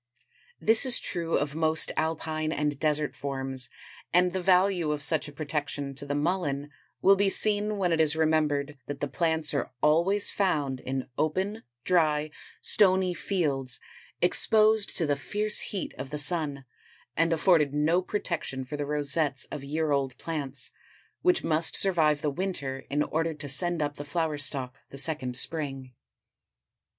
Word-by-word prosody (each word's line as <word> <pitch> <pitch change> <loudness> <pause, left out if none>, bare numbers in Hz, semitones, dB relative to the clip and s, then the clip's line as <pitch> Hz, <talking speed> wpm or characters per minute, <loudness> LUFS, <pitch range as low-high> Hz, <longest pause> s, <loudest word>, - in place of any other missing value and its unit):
This 220 +3 +4
is 255 -3 +4
true 170 -2 -2
of 145 0 -2
most 160 0 +2
alpine 155 0 -2
and 150 -2 -1
desert 150 -1 0
forms 135 -3 -4 0.4
and 180 0 +3
the 190 - -2
value 180 -2 +3
of 150 -1 0
such 155 +1 +4
a - - -9
protection 145 -1 -4
to 140 +1 -6
the 145 - -2
Mullen 145 -3 -1 0.3
will 195 +1 +7
be 195 0 +2
seen 210 +1 +2
when 180 -3 0
it 165 -1 +3
is 155 -1 +2
remembered 150 -3 0
that 145 - -5
the 145 - -2
plants 160 0 0
are 140 - -1
always 170 +8 +3
found 145 -9 0
in 130 +1 -4
open, 190 +8 -1 0.2
dry, 155 -4 +2 0.3
stony 190 -3 +3
fields 145 -10 -2 0.4
exposed 215 -1 +4
to 165 - +1
the 145 -1 +1
fierce 210 +7 +1
heat 195 - -4
of 130 - -5
the 150 - -4
sun, 145 -2 0 0.5
and 165 +1 +2
afforded 160 -3 +3
no 155 +5 +2
protection 170 -9 -3
for 145 +3 -6
the 145 -1 -3
rosettes 145 -1 +1
of 145 -2 -6
year 155 +2 -1
old 135 -3 -1
plants 140 -5 -2 0.5
which 360 -1 +2
must 160 +1 +2
survive 155 -6 +2
the 150 - +1
winter 140 -6 -3
in 145 +1 +1
order 160 +1 -2
to 145 -1 -7
send 170 +3 +2
up 145 0 -4
the 145 - -5
flower 155 0 -2
stalk 135 -3 -3
the 140 - -10
second 135 -3 0
spring. 135 -4 -2
155 Hz, 160 wpm, -27 LUFS, 145-175 Hz, 0.5 s, will